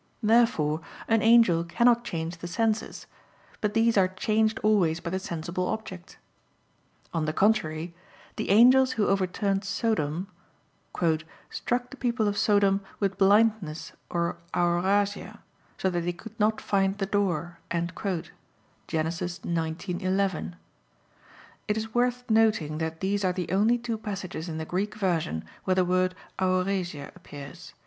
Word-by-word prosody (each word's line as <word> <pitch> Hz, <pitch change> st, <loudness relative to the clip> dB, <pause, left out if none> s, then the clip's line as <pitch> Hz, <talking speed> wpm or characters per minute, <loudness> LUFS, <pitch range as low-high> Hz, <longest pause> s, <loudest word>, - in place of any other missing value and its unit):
Therefore 210 Hz, -9 st, +3 dB, 0.3 s
an 225 Hz, -1 st, +3 dB
angel 225 Hz, -7 st, +5 dB
cannot 235 Hz, +7 st, +3 dB
change 165 Hz, -5 st, -4 dB
the 175 Hz, -, -6 dB
senses; 220 Hz, +4 st, -1 dB, 0.6 s
but 210 Hz, 0 st, -1 dB
these 225 Hz, -2 st, +4 dB
are 185 Hz, -, +4 dB
changed 215 Hz, +4 st, +1 dB
always 185 Hz, -7 st, +3 dB
by 170 Hz, 0 st, -5 dB
the 190 Hz, -, -1 dB
sensible 170 Hz, +1 st, -3 dB
object. 185 Hz, -4 st, -6 dB, 1.0 s
On 165 Hz, -2 st, 0 dB
the 155 Hz, -, -1 dB
contrary, 170 Hz, -5 st, +1 dB, 0.4 s
The -, -, -3 dB
angels 255 Hz, +5 st, +6 dB
who 215 Hz, -2 st, +1 dB
overturned 195 Hz, +1 st, 0 dB
Sodom, 190 Hz, -6 st, -1 dB, 1.3 s
"struck 245 Hz, +1 st, -2 dB
the 275 Hz, -, -10 dB
people 235 Hz, -4 st, 0 dB
of 205 Hz, -, 0 dB
Sodom 200 Hz, -1 st, +3 dB, 0.2 s
with 195 Hz, -2 st, -1 dB
blindness 205 Hz, -5 st, +3 dB, 0.2 s
or 170 Hz, 0 st, -1 dB, 0.2 s
aorasia, 190 Hz, +4 st, +1 dB, 0.4 s
so 190 Hz, -, 0 dB
that 175 Hz, -1 st, -1 dB
they 175 Hz, +1 st, -2 dB
could 220 Hz, +5 st, -12 dB
not 215 Hz, +1 st, +2 dB
find 195 Hz, 0 st, +1 dB
the 195 Hz, -, -1 dB
door" 175 Hz, -4 st, -1 dB
(Gen. 170 Hz, +1 st, -1 dB, 1.1 s
19:11). 175 Hz, -, -2 dB, 1.1 s
[*It 210 Hz, 0 st, 0 dB
is 220 Hz, 0 st, -4 dB
worth 245 Hz, 0 st, 0 dB
noting 220 Hz, -9 st, +2 dB
that 160 Hz, 0 st, -4 dB
these 200 Hz, +1 st, 0 dB
are 185 Hz, -1 st, +2 dB
the 180 Hz, -2 st, -4 dB
only 215 Hz, +5 st, +3 dB
two 235 Hz, -2 st, -4 dB
passages 190 Hz, -6 st, -5 dB
in 160 Hz, -, -4 dB
the 160 Hz, -, -4 dB
Greek 200 Hz, +6 st, -2 dB
version 165 Hz, -, -1 dB, 0.2 s
where 185 Hz, -, +2 dB
the 185 Hz, -1 st, +3 dB
word 185 Hz, +1 st, +1 dB, 0.2 s
aorasia 185 Hz, -5 st, -1 dB
appears. 140 Hz, -2 st, -11 dB
190 Hz, 135 wpm, -27 LUFS, 170-215 Hz, 1.3 s, angels